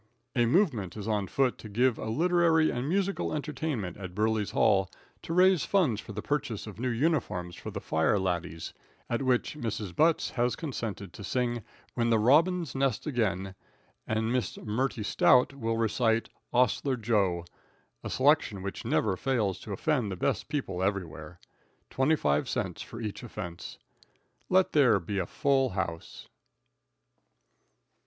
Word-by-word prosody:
A 120 -2 +3
movement 120 - +1
is 105 0 -5
on 105 -3 0
foot 130 +4 +1
to 110 - -9
give 120 +3 +2
a - - -4
literary 165 +3 +3
and 125 +4 -3
musical 195 0 0
entertainment 140 - -3
at 95 -3 -8
Burley's 110 0 +1
hall, 95 -3 +3 0.3
to - - -7
raise 180 -1 +5
funds 150 - +2
for - - -10
the 105 +1 -5
purchase 145 -7 -2
of 105 -1 -9
new 125 +1 -1
uniforms 115 - -1
for - - -7
the - - -5
"fire 80 +6 +1
laddies," 85 -4 -3 0.4
at 120 - 0
which 130 +2 +1
Mrs. 110 -8 -4
Butts 160 +1 +3
has 120 0 0
consented 115 - -5
to 100 - -9
sing 120 0 -1 0.3
"When 115 -1 0
the 115 - +4
Robins 155 +7 +3
Nest 135 -4 0
Again," 105 -8 -1 0.5
and 110 +2 0
Miss 125 -8 -1
Mertie 115 +1 -2
Stout 125 +5 +4
will 115 -4 -2
recite 115 0 +1 0.2
"'Ostler 125 +2 +2
Jo," 100 -7 +1 0.6
a - - -4
selection 130 -8 +2
which 100 - -5
never 105 -4 +1
fails 110 -4 0
to 105 - -9
offend 120 0 0
the - - -3
best - - -1
people 130 -12 -2
everywhere. 90 -4 -3 0.5
Twenty 135 +4 +3
five 75 - 0
cents - - -2
for 115 - -8
each 105 -3 -5
offense. 95 -8 -7 0.7
Let 185 0 +4
there 125 -9 +5
be 95 +3 -3
a 90 - -2
full 135 -2 +2
house. 85 -9 -5
115 Hz, 155 wpm, -29 LUFS, 100-135 Hz, 0.7 s, raise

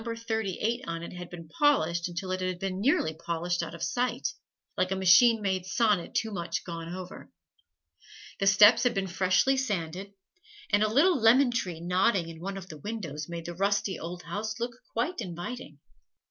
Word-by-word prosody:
38" 230 -1 -2
on 165 0 -4
it - - -8
had 180 -1 -8
been 170 -2 -10
polished 170 - +2
until 180 +2 -5
it 185 0 -2
had 185 -1 -2
been 190 +1 -3
nearly 205 - +2
polished 170 +2 -2
out 165 0 -6
of 170 - -7
sight, 245 +8 -1 0.5
like 185 - +1
a 190 - 0
machine 190 +5 +6
made 190 -2 0
sonnet 210 -2 +1
too 220 - 0
much 175 -4 -3
gone 165 -1 -6
over. 180 0 -8 1.1
The 195 - +1
steps 205 +4 +7
had 245 -2 +1
been 195 -1 0
freshly 185 +8 +2
sanded, 195 -6 -3 0.6
and 205 0 +4
a 215 - +4
little 305 +4 +4
lemon 245 +3 +5
tree 180 -9 -3
nodding 180 0 +1
in 165 -1 -10
one 195 +2 -4
of 185 -1 -8
the 155 -3 -9
windows 165 -6 -5
made 170 -1 -6
the 175 - -5
rusty 200 +1 0
old 175 +2 -7
house 220 +2 -4
look 240 +1 -3 0.2
quite 245 +6 -2
inviting. 175 - -7
190 Hz, 180 wpm, -28 LUFS, 170-225 Hz, 1.1 s, steps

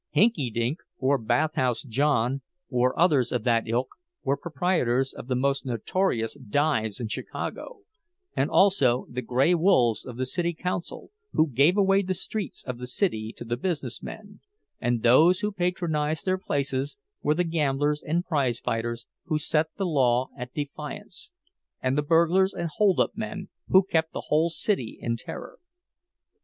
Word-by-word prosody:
"Hinkydink" 130 - +2 0.2
or 135 +1 +2
"Bathhouse 125 +2 +1
John," 135 0 +1 0.3
or 125 0 +1
others 145 -8 +3
of 120 -3 -1
that 115 -2 +2
ilk, 120 +3 0 0.3
were 140 - +1
proprietors 140 -6 0
of - - -9
the 130 - 0
most 135 +2 +1
notorious 120 - -1
dives 130 -4 0
in 120 - -3
Chicago, 450 - -5 0.5
and 135 - +1
also 140 -12 +4
the 125 +1 -3
"gray 130 +8 +2
wolves" 160 - +3
of 120 -2 -8
the 130 - -1
city 170 +5 -1
council, 180 - -4 0.2
who 155 - +3
gave 145 - +4
away 195 0 +4
the 185 -1 -2
streets 195 -1 -3
of 125 -1 -5
the 125 - -5
city 120 - 0
to - - -7
the 120 +1 -2
business 140 -7 -3
men; 205 -1 -9 0.4
and 120 -2 0
those 160 +10 +6
who 210 0 0
patronized 170 -5 -1
their 185 0 +1
places 140 -4 -2 0.2
were 150 - +2
the 180 - +2
gamblers 150 -3 0
and 170 +4 -1
prize 135 -8 0
fighters 115 +1 -3 0.2
who 160 -3 0
set 155 +1 +1
the 195 - -1
law 130 -6 +2
at 125 -2 -7
defiance, 155 - -7 0.5
and 130 +1 0
the 150 - +2
burglars 170 +5 +3
and 170 -1 -2
holdup 200 -3 +3
men 215 -3 -5 0.2
who 190 +1 +6
kept 160 -3 0
the - - -5
whole 160 +3 +3
city 165 - -1
in 115 -1 -1
terror. - - -8
145 Hz, 160 wpm, -26 LUFS, 125-180 Hz, 0.5 s, those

